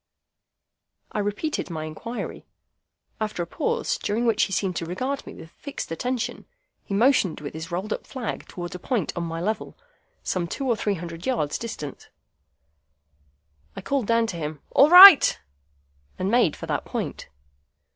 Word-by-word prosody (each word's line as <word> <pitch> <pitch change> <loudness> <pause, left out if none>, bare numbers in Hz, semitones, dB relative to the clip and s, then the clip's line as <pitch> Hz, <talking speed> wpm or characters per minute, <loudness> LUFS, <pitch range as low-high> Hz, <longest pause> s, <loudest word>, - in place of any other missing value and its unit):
I - - -3
repeated 205 +9 -2
my 160 -2 -4
inquiry. 230 +10 -7 0.7
After 215 -5 -2
a - - -5
pause, 470 - -2
during 220 +4 -1
which 225 -2 +3
he - - -9
seemed 190 -1 -1
to 165 - -3
regard 255 +11 -3
me - - -9
with 160 - -12
fixed 285 - -7
attention, 245 +6 -3 0.4
he 200 - -4
motioned 225 - +3
with 145 -1 -7
his 160 +3 -7
rolled 185 +5 -3
up - - -7
flag 255 -4 -5
towards 175 -1 -7
a 180 - -7
point 235 +1 -2
on 175 - -2
my 165 0 -4
level, 215 +6 -3 0.5
some 175 -2 -1
two 270 +10 -4
or 240 - +2
three 205 -2 -1
hundred 170 +1 -7
yards 150 - -1
distant. 150 - -7 1.7
I 195 - -6
called 270 +1 -1
down 230 0 +3
to 185 -6 -5
him, 150 -2 -6
"All 280 - +6
right!" 360 -2 +10 0.8
and 185 +2 -1
made 235 -10 +3
for - - -8
that - - -2
point. - - -5
205 Hz, 165 wpm, -24 LUFS, 170-245 Hz, 1.7 s, right